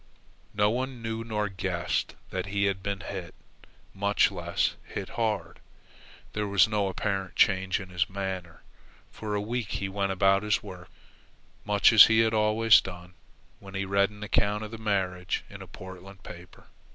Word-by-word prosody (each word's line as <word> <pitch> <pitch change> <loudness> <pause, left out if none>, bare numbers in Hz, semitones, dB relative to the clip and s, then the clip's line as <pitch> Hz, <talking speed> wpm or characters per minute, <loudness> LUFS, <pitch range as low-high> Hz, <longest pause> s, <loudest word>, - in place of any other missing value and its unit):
No 105 0 +3
one 125 0 -3
knew 115 0 -3
nor 105 -2 -1
guessed 90 -3 -2 0.2
that 95 +1 -3
he 100 0 -1
had 100 -1 0
been 100 0 -3
hit, 90 -4 -7 0.6
much 100 +1 +2
less - - -1
hit - - -6
hard. 110 -2 -2 0.7
There 105 -1 -2
was 100 +1 +5
no 105 -2 0
apparent 95 -1 -3
change 95 +1 +3
in 95 -2 -9
his 90 0 -1
manner. 95 -3 -5 0.5
For 105 -1 -4
a 100 - 0
week 115 +1 -3
he 95 - -2
went 100 0 -1
about 95 +1 +3
his 105 -1 0
work 95 -3 -10 0.8
much 105 +2 +4
as 110 - +11
he 110 0 +4
had 110 0 +2
always 110 +1 +5
done, 90 -1 -9 0.5
when 100 -1 -11
he 95 0 -1
read 100 +1 +2
an 105 0 -11
account 105 0 +1
of 110 - -7
the 115 - -8
marriage 95 -4 -1
in - - -10
a - - -9
Portland 95 0 -11
paper. 85 0 -12
100 Hz, 170 wpm, -28 LUFS, 95-105 Hz, 0.8 s, as